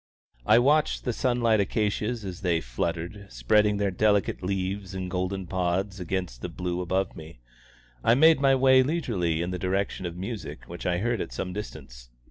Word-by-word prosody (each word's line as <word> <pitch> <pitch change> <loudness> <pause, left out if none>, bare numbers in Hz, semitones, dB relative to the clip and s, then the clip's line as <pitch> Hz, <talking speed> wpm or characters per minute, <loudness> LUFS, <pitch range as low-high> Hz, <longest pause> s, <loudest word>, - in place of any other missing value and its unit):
I 110 - +7
watched 145 +5 +3
the 125 - -1
sunlit 120 -3 +2
acacias 105 +2 -1
as 95 0 -6
they 85 -4 +1
fluttered, 85 - -4
spreading 105 - +2
their 100 -1 0
delicate 105 +1 +1
leaves 95 +1 -3
and 90 -1 -4
golden 95 +1 -2
pods 95 +2 -1
against 90 -8 -3
the - - -4
blue 90 0 -3
above 95 +2 -1
me. 80 -4 -11 0.7
I 115 - +5
made 160 +1 +6
my 135 -1 +5
way 130 0 +6
leisurely 105 - 0
in 90 - -3
the 90 - -3
direction 95 0 -1
of 85 0 -7
music 100 +4 -6
which 85 +1 -6
I 90 -1 +1
heard 120 +5 -1
at - - -5
some 90 - -4
distance. - - -8
95 Hz, 175 wpm, -27 LUFS, 90-110 Hz, 0.7 s, I